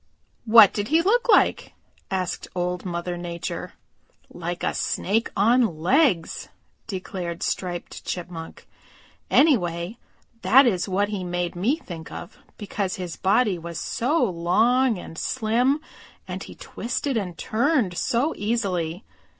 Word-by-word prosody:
"What 220 -3 +8
did 205 0 -2
he 320 +3 +3
look 475 +6 +2
like?" - - +3 0.4
asked 185 -2 -2
Old 180 0 -2
Mother 175 0 -3
Nature. 170 -1 -5 0.6
"Like 175 0 -5
a - - 0
snake 220 +5 0
on 225 -4 +3
legs," 180 - +1 0.4
declared 185 -3 -5
Striped 175 -2 -3
Chipmunk. 170 -2 -6 0.6
"Anyway, 180 - +2 0.4
that 265 +3 +6
is 195 -5 +1
what 200 +2 +1
he 200 -3 -3
made 175 -1 -2
me 215 - +1
think 170 - -9
of, 175 - -9 0.2
because 200 -2 -3
his 180 -3 -5
body 200 -1 +2
was 170 0 -6
so 275 +5 0
long 225 +6 +2
and 165 -2 -8
slim 250 +4 +1 0.5
and - - -5
he - - -9
twisted 255 +3 -3
and 185 -6 -3
turned 240 - +1
so 250 - 0
easily. 195 -5 -1
195 Hz, 125 wpm, -24 LUFS, 175-240 Hz, 0.6 s, What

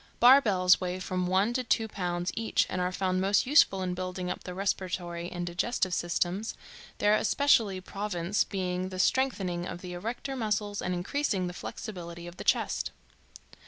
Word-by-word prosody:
Bar 260 +4 +8
bells 185 -6 +4
weigh 180 0 -2
from 185 -1 -2
one 195 +5 +2
to 255 +1 0
two 225 -2 +1
pounds 175 -3 -2
each 225 0 +1
and 185 - -1
are 180 0 0
found 185 0 0
most 195 +2 +3
useful 245 -9 +4
in 180 -1 -1
building 185 0 -4
up - - -6
the 180 - -6
respiratory 180 -3 -2
and 175 0 -3
digestive 185 +2 -1
systems, 175 +5 -1 0.4
their 205 0 +3
especial 220 -4 +3
province 195 -1 -1
being 185 -1 -3
the 185 - -7
strengthening 185 -6 +1
of 175 - -6
the 180 -1 -7
erector 235 +9 -4
muscles 210 -3 -1
and 180 0 -1
increasing 195 +1 -1
the 180 - -4
flexibility 175 -4 -7
of 175 +1 -10
the - - -6
chest. - - +1
185 Hz, 170 wpm, -29 LUFS, 180-210 Hz, 0.4 s, Bar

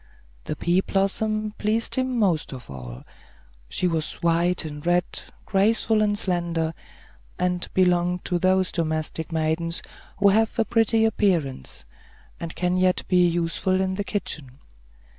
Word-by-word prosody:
The - - -3
pea 175 +2 +2
blossom 215 +2 0
pleased 220 +2 0
him 255 -1 0
most 180 -10 +1
of 125 - -10
all; 60 -2 -8 0.7
she 180 - 0
was 160 -3 -1
white 170 +1 +2
and 150 -1 -7
red, 175 0 +2 0.4
graceful 215 +2 +3
and 205 -1 +2
slender, 170 -4 -1 0.6
and 180 -1 -1
belonged 180 -1 +2
to 175 - 0
those 185 0 +2
domestic 160 0 -2
maidens 165 +1 -1 0.3
who 200 +1 +5
have 220 +2 +2
a 225 - +2
pretty 225 -1 +3
appearance, 165 - 0 0.5
and 165 -1 -6
can 180 +1 0
yet 185 0 +2
be 180 -1 +4
useful 175 +2 0
in 190 0 0
the 205 +2 -2
kitchen. 150 -10 -4
180 Hz, 140 wpm, -24 LUFS, 165-200 Hz, 0.7 s, who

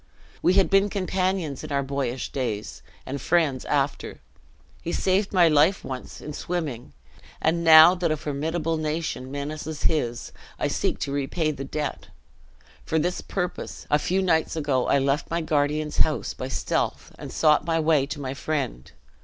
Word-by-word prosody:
We 180 - +4
had 195 0 +3
been 195 +1 +4
companions 185 -6 -1
in - - -7
our 140 0 +1
boyish 135 -2 -3
days, 115 -6 -4 0.2
and 135 0 -5
friends 155 -7 +1
after. 145 -1 -1 0.6
He 170 - -4
saved 195 +3 +1
my 180 -3 +5
life 155 +5 +3
once, 130 -1 -7
in 150 - -7
swimming; 150 -9 -4 0.5
and 170 +2 +1
now 160 +1 +9
that 180 -2 -1
a 155 - 0
formidable 160 +3 -2
nation 155 -4 -3
menaces 150 +2 -5
his, 120 -7 0 0.3
I - - -1
seek - - -1
to 140 - -2
repay 145 +3 -1
the 135 -2 -6
debt. 150 +1 -4 0.8
For 160 - -1
this 175 +4 0
purpose, 180 -2 -4
a 150 - +4
few 190 +5 0
nights 160 -4 +1
ago 145 -5 0
I - - +4
left 140 +2 0
my 170 +1 -1
guardian's 150 0 0
house 155 - +1
by 130 - -5
stealth, - - -2
and - - -7
sought 150 -2 +3
my 165 -1 +2
way 155 -3 +3
to 145 +1 -5
my 135 -2 -4
friend. 135 - -3
155 Hz, 165 wpm, -25 LUFS, 140-170 Hz, 0.8 s, now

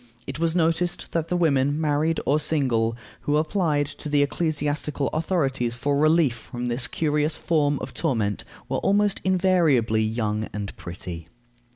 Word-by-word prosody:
It 135 +2 -6
was 165 0 +1
noticed 170 +1 0
that 165 -1 -1
the 180 - 0
women, 145 -3 +2
married 155 +1 +1
or 150 +2 +3
single, 120 -7 0 0.2
who 145 +1 0
applied 155 -2 +1
to 145 +1 -7
the 145 -1 +3
ecclesiastical 150 -1 -1
authorities 135 -8 -1
for 140 +3 0
relief 155 -2 +3
from 120 +1 -6
this 120 +1 0
curious 150 0 0
form 145 -3 +1
of 130 - -6
torment 115 - -1 0.2
were - - -1
almost 205 0 +2
invariably 170 - +3
young 110 -1 -1
and 100 -1 -5
pretty. 85 -1 -7
145 Hz, 150 wpm, -24 LUFS, 120-165 Hz, 0.2 s, or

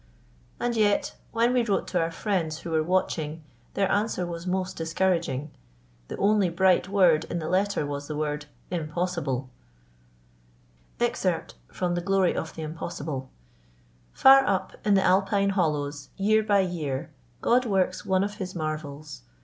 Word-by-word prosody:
And 240 0 -1
yet, 210 -2 +2 0.2
when 235 +2 +2
we 250 - +3
wrote 205 -4 0
to 180 - +1
our 165 - 0
friends 165 -3 -2
who 170 - -6
were 160 -1 +2
watching, 160 -2 -1 0.3
their 195 -1 +2
answer 205 -3 0
was 170 0 -6
most 185 0 -1
discouraging. 165 -4 -1 0.6
The - - -6
only 200 -2 +3
bright 185 +1 +3
word 175 -6 +4
in - - -4
the 160 -2 -3
letter 195 -2 +1
was 145 0 -5
the 155 - -4
word 150 -1 -2 0.2
"Impossible." 155 -6 -2 1.5
"Far - - 0 3.0
up 265 -8 +6
in 205 - +3
the 190 - +3
Alpine 195 +2 +3
hollows, 150 -6 -1
year 215 +2 +3
by 205 -2 +3
year, 155 -6 -3 0.3
God 250 +1 +3
works 190 -3 0
one 190 0 +2
of 205 +1 -3
His 185 -2 -5
marvels. 155 - -5
180 Hz, 130 wpm, -26 LUFS, 155-200 Hz, 3.0 s, up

